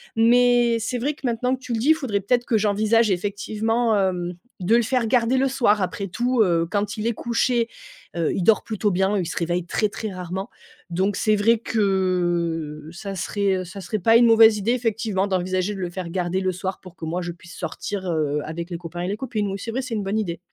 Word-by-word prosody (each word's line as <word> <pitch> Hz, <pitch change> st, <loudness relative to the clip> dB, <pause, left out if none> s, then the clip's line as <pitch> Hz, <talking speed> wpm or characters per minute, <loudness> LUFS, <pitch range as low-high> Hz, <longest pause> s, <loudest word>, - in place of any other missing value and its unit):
Mais, 240 Hz, +1 st, +4 dB
c'est 225 Hz, +3 st, -2 dB
vrai 285 Hz, +5 st, 0 dB
que, 300 Hz, -, -21 dB
maintenant 250 Hz, +2 st, 0 dB
que -, -, -15 dB
tu 250 Hz, -, -5 dB
le 225 Hz, -, 0 dB
dis, 290 Hz, +8 st, +5 dB
faudrait 265 Hz, -10 st, -2 dB
peut-être 240 Hz, +5 st, +1 dB
que 225 Hz, -, +2 dB
j'envisage, 215 Hz, +2 st, +2 dB
effectivement, 215 Hz, +4 st, 0 dB
hem, 180 Hz, -2 st, 0 dB, 0.3 s
de 185 Hz, +5 st, +3 dB
le 235 Hz, -, +4 dB
faire 245 Hz, 0 st, 0 dB
garder 245 Hz, +2 st, +2 dB
le 270 Hz, -, +3 dB
soir. 235 Hz, -6 st, +2 dB
Après 195 Hz, +2 st, -2 dB
tout, 240 Hz, +5 st, 0 dB
heu, 170 Hz, -3 st, +1 dB
quand 205 Hz, +2 st, -1 dB
il 215 Hz, +1 st, -2 dB
est 235 Hz, -, +1 dB
couché, 235 Hz, +1 st, 0 dB, 0.5 s
heu, 165 Hz, -2 st, 0 dB
il 190 Hz, -, -1 dB
dort 220 Hz, +3 st, +4 dB
plutôt 215 Hz, -2 st, -1 dB
bien. 190 Hz, +3 st, +1 dB
Il 185 Hz, -, -1 dB
se 165 Hz, -, -5 dB
réveille 175 Hz, +1 st, -1 dB
très, 210 Hz, +4 st, 0 dB
très 215 Hz, +1 st, -5 dB
rarement. 185 Hz, +3 st, -5 dB, 0.4 s
Donc, 190 Hz, +4 st, 0 dB
c'est 215 Hz, +2 st, +2 dB
vrai 225 Hz, +3 st, +3 dB
que 175 Hz, -7 st, -1 dB
ça 195 Hz, +3 st, -6 dB
serait, 200 Hz, +1 st, 0 dB
heu, 185 Hz, -, -5 dB
ça 190 Hz, +3 st, -9 dB
serait 215 Hz, -, -3 dB
pas 225 Hz, +5 st, +5 dB
une 240 Hz, -, +5 dB
mauvaise 225 Hz, -1 st, +7 dB
idée, 210 Hz, +4 st, 0 dB
effectivement, 225 Hz, -5 st, 0 dB
d'envisager 185 Hz, 0 st, -1 dB
de 195 Hz, -, -7 dB
le 180 Hz, -2 st, -2 dB
faire 175 Hz, -1 st, -6 dB
garder 180 Hz, +1 st, -1 dB
le 185 Hz, -1 st, 0 dB
soir 190 Hz, +1 st, -4 dB
pour 185 Hz, -2 st, -13 dB
que 165 Hz, -, -7 dB
moi 170 Hz, +3 st, -2 dB
je 175 Hz, -1 st, -4 dB
puisse 175 Hz, +1 st, -13 dB
sortir, 200 Hz, -3 st, -5 dB
heu, 150 Hz, -3 st, 0 dB
avec 170 Hz, +2 st, -5 dB
les 175 Hz, -, -4 dB
copains 170 Hz, 0 st, -7 dB
et 180 Hz, -, -2 dB
les 200 Hz, +2 st, -2 dB
copines. 215 Hz, -4 st, -2 dB
Oui, 195 Hz, -, -3 dB
c'est 230 Hz, -, -5 dB
vrai, 260 Hz, +4 st, -1 dB
c'est 250 Hz, -3 st, -4 dB
une 210 Hz, -, -2 dB
bonne 200 Hz, +3 st, -1 dB
idée. 175 Hz, -6 st, -3 dB
205 Hz, 235 wpm, -23 LUFS, 180-230 Hz, 0.5 s, mauvaise